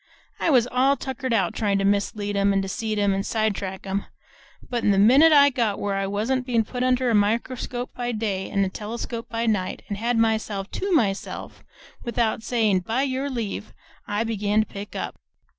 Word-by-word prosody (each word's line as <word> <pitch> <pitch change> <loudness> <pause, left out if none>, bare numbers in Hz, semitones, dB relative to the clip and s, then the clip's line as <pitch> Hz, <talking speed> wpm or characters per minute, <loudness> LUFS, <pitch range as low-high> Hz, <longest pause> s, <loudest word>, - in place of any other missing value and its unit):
I - - +1
was 250 -6 +5
all 265 +3 +3
tuckered 260 0 -4
out 195 -6 +2
tryin' 205 -3 0
to 195 - 0
mislead 205 +1 0
'em 200 0 +3
and 195 - +2
deceive 210 +3 -2
'em 200 -1 +2
and 195 0 -1
sidetrack 200 -4 -2
'em; 195 +1 -2 0.6
but 240 -2 -2
the 200 -3 +3
minute 265 +11 +7
I 285 -1 +7
got 230 -5 0
where 200 -1 -1
I 195 0 -1
wa'n't 240 +6 -1 0.2
put 250 - -4
under 255 -1 +2
a - - +2
microscope 235 +4 0
by 245 0 -3
day 210 -4 -2
an' 200 -1 +1
a - - -2
telescope 230 +3 -6
by 230 0 -2
night 195 -5 -1
and 205 -1 -3
had 235 +1 0
myself 220 -3 0
TO 395 +1 -3
myself 210 - -1 0.4
without 235 -2 0
sayin' 220 -5 +2
'By 225 +9 -1
your 270 +1 -1
leave,' 225 -5 -4 0.3
I 205 +2 0
begun 210 -1 +1
to - - -1
pick 205 0 -9
up. - - -5
220 Hz, 190 wpm, -24 LUFS, 200-245 Hz, 0.6 s, minute